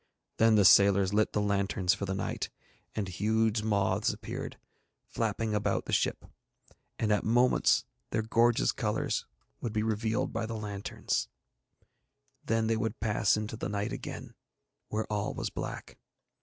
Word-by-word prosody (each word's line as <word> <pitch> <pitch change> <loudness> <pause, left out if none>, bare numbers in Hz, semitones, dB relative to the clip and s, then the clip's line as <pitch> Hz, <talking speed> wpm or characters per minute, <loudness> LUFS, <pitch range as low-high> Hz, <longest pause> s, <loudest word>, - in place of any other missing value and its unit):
Then 115 0 +5
the 105 -2 +5
sailors 100 0 +6
lit 105 +1 +2
the - - +1
lanterns 100 -3 +1
for 100 - -3
the 95 - -1
night, - - -3 0.5
and 105 -3 -2
huge 110 +4 +1
moths 100 -3 +1
appeared, - - -6 0.5
flapping 110 -1 -2
about 105 -1 0
the - - -4
ship, - - +1 0.7
and 110 -2 0
at 105 - +2
moments 120 +3 +3 0.2
their 110 - 0
gorgeous 115 +1 +3
colours - - -1 0.3
would 115 - -4
be 110 -1 0
revealed 110 +1 -1
by 110 0 -2
the 115 0 -4
lanterns, 100 -2 -3 1.1
then 115 0 +1
they 110 0 +1
would 110 0 -2
pass 105 -2 +2
into 105 +1 -4
the 110 - -4
night 100 0 -2
again, - - -7 0.5
where 110 +1 -2
all 105 -1 -2
was - - -3
black. - - -6
105 Hz, 150 wpm, -30 LUFS, 100-110 Hz, 1.1 s, sailors